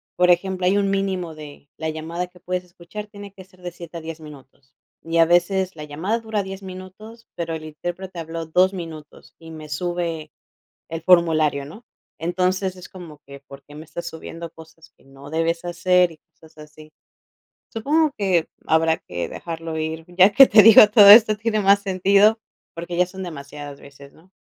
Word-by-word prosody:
por 180 0 +2
ejemplo, 185 +1 0
hay 190 +2 +3
un 200 -1 +1
mínimo 190 -4 -2
de 145 -2 -12
la 160 - -4
llamada 165 +3 -5
que 180 0 -21
puedes 180 +1 -4
escuchar. 180 +4 -10
Tiene 205 -1 -12
que 190 -1 -13
ser 185 0 -24
de 175 - -6
7 170 -1 -10
a - - -8
10 160 0 -8
minutos, 135 -3 -15 0.3
y 165 +1 -2
a 165 - +6
veces 185 +2 +1
la 155 - -8
llamada 165 +10 -3
dura 220 -2 -3
10 195 +1 -9
minutos, 190 +5 -11
pero 165 -1 -4
el 155 - -8
intérprete 175 +4 -7
habló 165 0 -6
2 180 +4 +2
minutos 160 -4 -10
y 165 -1 -13
me 155 -1 -10
sube 165 0 -4 0.6
el 165 0 -5
formulario, 160 -5 +3
¿no? 190 - -13 0.4
Entonces, 185 +2 -1
es 180 - -11
como 170 -5 -12
que: 140 0 -12
"¿Por 140 0 -14
qué 145 - -15
me 155 - -9
estás 170 +2 -8
subiendo 165 +1 -8
cosas 160 0 -17
que - - -28
no 135 +1 -14
debes 165 +2 -2
hacer?", 175 0 +2
y 155 - -21
cosas 155 +1 -21
así. 155 0 -15 0.8
Supongo 295 +7 0
que 185 -5 +1 0.2
habrá 160 0 +2
que 85 -1 -6
dejarlo 165 -1 -6
ir, 160 +1 -5
ya 185 +3 +5
que 270 +6 +8
te 215 -3 +6
digo, 215 0 +9
todo 205 -2 +8
esto 215 0 +8
tiene 220 0 -1
más 200 0 +4
sentido 200 +3 +3 0.4
porque 170 +1 -6
ya 180 0 +2
son 190 +1 -9
demasiadas 145 -3 -9
veces, 140 0 -15
¿no? 180 +4 -23
170 Hz, 190 wpm, -21 LUFS, 160-190 Hz, 0.8 s, digo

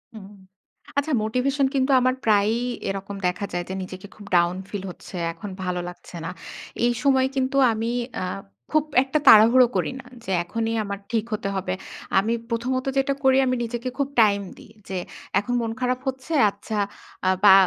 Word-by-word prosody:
হুম, 200 -1 -10 0.7
আচ্ছা 295 +2 +1
মোটিভেশন 270 +5 +1
কিন্তু 265 +1 +2
আমার 255 +1 +2
প্রায়ই 215 +2 +3 0.3
এরকম 195 +1 -4
দেখা 180 +3 -2
যায় 175 0 -1
যে, - - -3
নিজেকে 185 +1 -9
খুব 210 - -12
ডাউন 175 +1 +4
ফিল 205 -2 -5
হচ্ছে, 180 - -12 0.2
এখন 205 +4 -8
ভালো 180 -1 -1
লাগছে 180 - -12
না। 165 - -3 0.6
এই 240 - +4
সময় 265 -1 +4
কিন্তু 265 +1 0 0.2
আমি 225 +1 -1 0.3
আ - - -1 0.5
খুব 310 -1 +3 0.2
একটা 275 +3 0
তাড়াহুড়ো 230 +4 +8
করি - - 0
না। 265 - -12 0.2
যে 190 - -4
এখনই 225 +5 -2
আমার 200 -1 -5
ঠিক 225 -2 +1
হতে 195 -2 -2
হবে। 185 -1 -2 0.5
আমি 220 +4 0 0.2
প্রথমত 255 +3 -1
যেটা 275 +1 +2
করি, 265 0 +5
আমি 255 0 +1
নিজেকে 240 +2 -3
খুব 280 - +1
টাইম 200 -2 +4 0.2
দিই। - - -15 0.2
যে 190 - -3 0.4
এখন 205 +5 -3
মন 225 -1 -2
খারাপ 255 0 0
হচ্ছে, 265 +4 -3 0.2
আচ্ছা 205 +2 -6 0.5
আ - - +5
বা 200 -2 +9
225 Hz, 175 wpm, -24 LUFS, 200-260 Hz, 0.7 s, বা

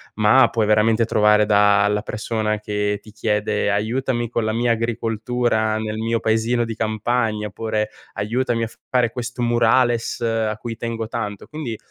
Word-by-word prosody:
ma 110 +5 +5
puoi 110 -2 0
veramente 110 +2 +3
trovare 105 -1 +3
da 105 -1 +4
la 105 0 0
persona 105 -1 -2
che 105 -1 -2
ti 110 - -15
chiede: 105 -1 -1
"Aiutami 120 +3 -1
con 115 -1 -1
la 110 - 0
mia 120 +1 +1
agricoltura 115 -1 -1
nel 110 0 -4
mio 115 +1 0
paesino 115 +2 +1
di 115 -1 -4
campagna" 110 0 -1
oppure 110 +1 -2 0.2
"Aiutami 115 +2 -1
a 115 - -3 0.2
fare 120 -3 +2
questo 120 0 -5
murales 120 0 +2
a 115 -2 0
cui 115 0 -6
tengo 115 -1 -4
tanto". 105 -4 -5
Quindi, 145 -8 -5
110 Hz, 155 wpm, -21 LUFS, 105-120 Hz, 0.2 s, ma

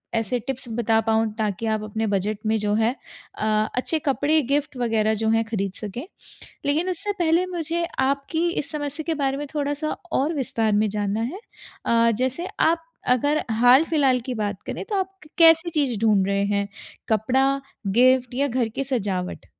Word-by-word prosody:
ऐसे 225 +2 0
टिप्स 260 +1 -5
बता 225 -1 +3
पाऊँ 225 0 +2
ताकि 215 0 -2
आप 215 - -4
अपने 220 +1 -2
बजट 205 +1 0
में 220 0 +2
जो 205 0 0
है 225 +2 +2 0.5
अ, 215 - -2 0.3
अच्छे 310 +5 0
कपड़े 295 +2 +2
गिफ्ट 290 -2 0
वगैरह 220 -2 +1
जो 220 - +2
हैं 225 0 +3
खरीद 200 -4 -2
सकें। 225 - -5 0.6
लेकिन 315 +6 +1
उससे 395 +4 -2
पहले 340 +2 +3
मुझे 340 -1 -2 0.2
आपकी 280 +5 0
इस 295 - -3
समस्या 295 +1 -3
के 330 - 0
बारे 270 0 +1
में 290 +1 -4
थोड़ा-सा 290 +1 -1 0.2
और 300 +5 +1
विस्तार 225 -5 0
में 215 - +1
जानना 205 +1 -1
है 345 - -4 0.5
अ, 230 0 +4
जैसे 260 - -1
आप 330 +1 +3 0.3
अगर 285 +5 +2 0.2
हाल-फिलहाल 265 0 +5
की 255 - -2
बात 210 -3 -3
करें - - -4
तो 415 - -3
आप 380 0 -1
क - - -16
कैसी 330 +1 +6
चीज़ 275 -8 0
ढूँढ 210 -4 +3
रहे 200 0 +1
हैं, 200 0 0 0.4
कपड़ा, 265 +6 +2 0.3
गिफ्ट 250 +4 +3
या 280 +2 +1
घर 240 -2 0
की 275 - -1
सजावट? 195 -8 -3
250 Hz, 180 wpm, -23 LUFS, 220-300 Hz, 0.6 s, कैसी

